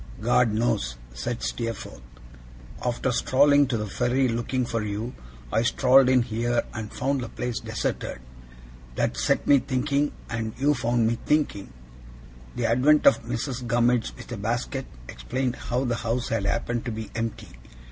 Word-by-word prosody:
'God 120 +1 +3
knows,' 105 - 0 0.2
said - - -4
Steerforth. 80 - -4 0.8
'After 125 +1 0
strolling 140 +3 +4
to 125 -2 -1
the 105 - -2
ferry 125 +5 +1
looking 120 +2 -1
for 115 -1 -2
you, 105 +4 -4 0.4
I 110 - +3
strolled 130 +2 +5
in 130 -2 +4
here 120 +1 0
and 110 -2 -5
found 135 +1 -1
the 120 - -5
place 125 -1 -3
deserted. - - -3 0.8
That - - 0
set - - +1
me 140 - +6
thinking, 140 +3 0 0.2
and 115 -1 -4
you 145 +3 +3
found 120 -3 +1
me 115 +1 0
thinking.' 145 - 0 0.8
The 120 - -1
advent 130 +6 +4
of - - +6
Mrs. 125 +1 -3
Gummidge 120 0 +2
with - - -11
a 120 - -4
basket, 120 +5 -2 0.2
explained 130 0 -3
how 125 +2 -2
the 120 -1 0
house 115 +1 -2
had 110 -3 0
happened 115 +2 -1
to 120 - -2
be 110 -1 -6
empty. 115 -1 -4
120 Hz, 155 wpm, -25 LUFS, 115-130 Hz, 0.8 s, me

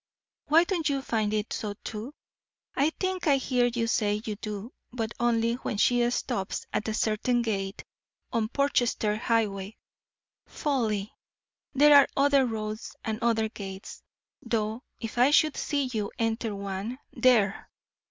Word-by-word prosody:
Why 320 +3 +6
don't 345 -4 -1
you 275 -1 -1
find 215 -5 0
it 215 0 -1
so 205 -2 -4
too? 225 +7 -6 0.6
I 280 +3 +3
think 375 -2 -1
I 280 -2 +5
hear 250 -2 +1
you 235 -1 -1
say 210 -2 +1
you 215 - -3
do, 210 +2 -6 0.2
but 230 -2 -3
only 230 -1 +2
when 235 -3 -4
she 240 +2 +3
stops 240 -5 -2
at 210 - -1
a 220 - -1
certain 235 +3 +1
gate 195 -3 -3 0.5
on 225 -2 +1
Portchester 245 -6 +1
highway. 215 -3 -1 0.7
Folly! 220 -9 -1 0.6
there 295 +2 +7
are 280 - +8
other 275 -1 +4
roads 215 -1 -5
and 220 -1 -2
other 225 -2 +2
gates, 195 -2 -8 0.4
though 220 +1 -2 0.2
if 230 +2 -5
I 250 +3 +6
should 305 0 +4
see 285 -2 -1
you 210 -2 -2
enter 225 -1 -1
one 200 +4 -4 0.2
There! 220 -6 +3
230 Hz, 145 wpm, -28 LUFS, 215-255 Hz, 0.7 s, are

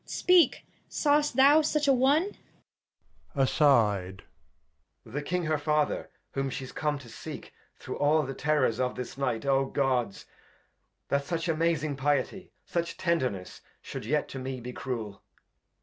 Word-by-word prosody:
— - - -41 0.2
Speak, 360 -2 +4 0.2
sawest 295 -2 +2
thou 280 +4 +7
such 300 -1 0
a 275 - +6
one? 285 +10 +3 1.0
Edg. 110 -9 +2 0.8
The 135 +7 -4
King 180 +4 -2
her 155 -1 0
Father, 150 0 0 0.2
whom 135 0 -2
she's 130 0 -6
come 150 -1 -1
to 135 -4 -12
seek; - - -9 0.2
Through - - -7
all 150 +2 +3
the 135 -1 -4
Terrors 135 -5 +1
of 125 -1 0
this 125 - -6
Night: 135 -4 -1
OGods! 135 -5 +1
[Aside. - - -27 0.8
That 140 0 +1
such 165 +2 -2
amazing 160 -3 0
Piety, 145 +7 -1
such 170 -1 -3
Tenderness 130 - -1 0.2
Shou'd - - -7
yet 150 +3 +1
to 135 - -6
me 130 0 -4
be 125 +1 -7
Cruel. 115 -7 -5
145 Hz, 145 wpm, -28 LUFS, 130-170 Hz, 1.0 s, thou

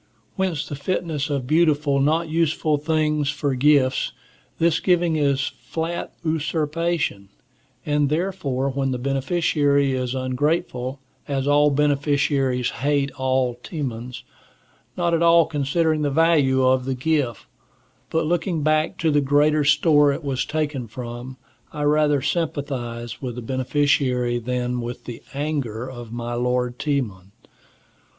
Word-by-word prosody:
Hence 185 -6 -1
the - - -6
fitness 155 -1 -2
of 140 -3 -2
beautiful, 150 -2 +2
not 160 +4 +2
useful 155 -2 +1
things 150 -1 0
for 145 -2 -1
gifts. 135 0 +2 0.4
This 165 -1 +2
giving 175 -3 +2
is 140 -3 +2 0.2
flat 165 +1 -4
usurpation, 155 - -1 0.6
and 145 -1 +1
therefore 150 -6 -1
when 135 0 -1
the 130 - -1
beneficiary 140 +1 +1
is 130 0 -2
ungrateful, 130 0 -1 0.3
as 135 -1 -1
all 145 +1 +5
beneficiaries 140 -3 +1
hate 140 -1 +1
all 130 -1 0
Timons, 125 -6 -5 0.7
not 175 -1 +1
at 165 - +2
all 170 -1 +6
considering 155 +1 0
the 145 - +1
value 140 -4 +3
of 130 0 +3
the 135 0 -1
gift, 130 -4 -1 0.6
but 160 0 0
looking 165 -1 -1
back 155 +1 +1
to 160 -2 +1
the 145 0 +3
greater 145 +2 +3
store 150 0 +4
it 145 +3 -4
was 135 -3 -1
taken 150 -5 -2
from, 120 +2 -7 0.3
I 150 - -4
rather 150 -1 +3
sympathize 135 -7 -3
with 125 -3 -4
the 125 - -6
beneficiary 130 -1 +1
than 125 +1 -2
with 120 +1 -6
the 120 -2 -7
anger 135 -6 -2
of 120 -3 -9
my 120 0 -4
lord 125 0 -1
Timon. 105 -10 -2
145 Hz, 130 wpm, -23 LUFS, 130-155 Hz, 0.7 s, all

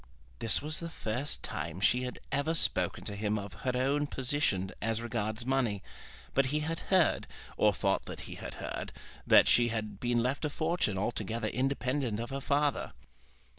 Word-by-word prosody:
This 115 - +3
was 155 +1 0
the 170 - -4
first 130 -1 -2
time 85 +1 -4
she 125 +6 +3
had 125 - -5
ever 145 +4 +1
spoken - - +1
to 100 - -4
him 105 +1 0
of 100 -1 -6
her 125 - 0
own 140 +3 +1
position 125 -9 0
as 115 +1 0
regards 115 -1 -2
money; 125 -7 +1 0.5
but 135 -1 +3
he 150 +3 0
had 165 +2 -2
heard, 185 -4 +3 0.3
or - - +4
thought - - 0
that - - -6
he - - -7
had - - -7
heard, - - -5 0.3
that - - +7
she 120 -1 +5
had 110 -3 -3
been 120 -1 +1
left 130 +5 -1
a 150 - +1
fortune 160 - 0
altogether 110 +1 -1
independent 130 -2 0
of 120 +3 -4
her 135 0 -3
father. 145 +1 +1
125 Hz, 175 wpm, -31 LUFS, 110-145 Hz, 0.5 s, that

